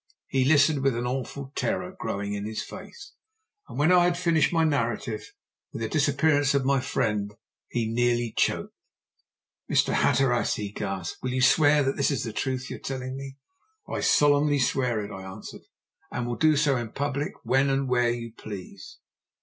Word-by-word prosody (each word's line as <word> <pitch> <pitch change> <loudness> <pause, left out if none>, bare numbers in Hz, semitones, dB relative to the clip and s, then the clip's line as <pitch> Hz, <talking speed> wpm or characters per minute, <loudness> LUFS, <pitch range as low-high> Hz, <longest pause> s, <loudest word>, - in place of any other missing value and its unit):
He 130 -1 +1
listened, 145 0 +4
with 135 -2 +2
an 120 +1 -2
awful 135 +2 -4
terror 185 +1 -2
growing 100 - -3
in 100 0 -4
his 110 +1 -4
face, 410 -3 -11 0.6
and - - -8
when 155 +5 +3
I 180 -1 +6
had 175 0 +1
finished 170 -3 +2
my 165 -1 +2
narrative 115 -6 -1 0.4
with 115 - -5
the - - 0
disappearance 145 -1 +2
of 135 -2 +1
my 135 0 +3
friend 105 -5 -1 0.3
he 115 -2 -1
nearly 120 0 0
choked. - - 0 1.0
"Mr. - - +3
Hatteras," 125 -3 +2
he 105 -2 -5
gasped, 95 -4 -5
"will 130 - -2
you 130 - 0
swear 145 +1 +5
this 135 +1 +1
is 140 -6 -1
the 115 -2 -5
truth 130 +2 -2
you - - -5
are - - -16
telling 130 -1 -5
me?" 135 0 -8 0.5
"I - - -3
solemnly 145 0 +4
swear 125 -5 0
it," 100 - -9
I 95 - -7
answered. 95 +2 -9 0.5
"And 120 - -3
will 120 0 -2
do 155 +1 +3
so 140 -2 +3
in 120 -2 -5
public 145 +1 -2
when 135 +2 +2
and 135 0 0
where 120 -1 +2
you 115 -1 -4
please." 100 -5 -9
130 Hz, 180 wpm, -26 LUFS, 115-145 Hz, 1.0 s, I